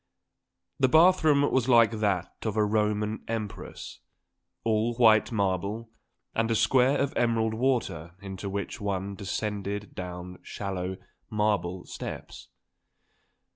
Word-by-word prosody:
The 130 - +5
bath 175 +5 +6
room 145 -2 +5
was 130 -1 +1
like 115 -2 +6
that 100 -4 0
of 110 -1 -2
a 105 - +4
Roman 105 0 0
Empress, 110 -3 -6 0.6
all 115 +1 +1
white 110 -1 +5
marble, 100 +2 -1 0.4
with 115 0 +1
a 115 - +2
square 125 +5 +4
of 140 - 0
emerald 115 -2 +1
water 110 -9 -1
into 95 0 -6
which 100 +1 -4
one 100 -1 -2
descended 100 +1 -4
down 90 0 -7
shallow 95 -2 -4 0.3
marble 100 -4 0
steps. - - -7
105 Hz, 120 wpm, -28 LUFS, 100-115 Hz, 0.6 s, bath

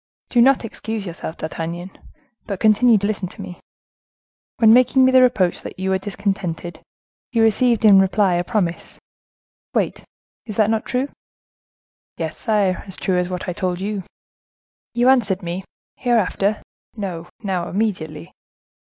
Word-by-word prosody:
"Do 240 - +4
not 260 -1 +4
excuse 220 -1 -5
yourself, 165 -2 -6
D'Artagnan, 170 +3 -5 0.6
but 200 -4 -4
continue 220 +2 +5
to 200 - -2
listen 205 -3 -2
to - - -13
me. 180 - -8 1.0
When 220 -1 +6
making 255 +2 +5
me 260 - +4
the 260 0 +6
reproach 215 -8 +2
that - - -9
you 190 +1 -1
were 190 - +1
discontented, 190 -4 -4 0.5
you 230 -2 +2
received 225 +1 +3
in 200 -2 +8
reply 195 0 +3
a 175 0 +1
promise:—'Wait.'—Is 205 +2 -5
that 215 0 +3
not 220 -1 -1
true?" 255 +3 -1 1.1
"Yes, 160 -2 -3
sire, 205 -4 0
as 190 - -7
true 185 -2 0
as 180 0 -1
what 180 +2 -5
I 180 - -2
told 180 0 -2
you." 200 +1 -3 0.9
"You 240 +1 +3
answered 210 -8 +3
me, 175 +2 -4 0.4
'Hereafter! 215 -3 +1 0.3
No, 175 -5 -5
now, 185 -3 -2
immediately. 185 - -3
200 Hz, 145 wpm, -21 LUFS, 180-225 Hz, 1.1 s, in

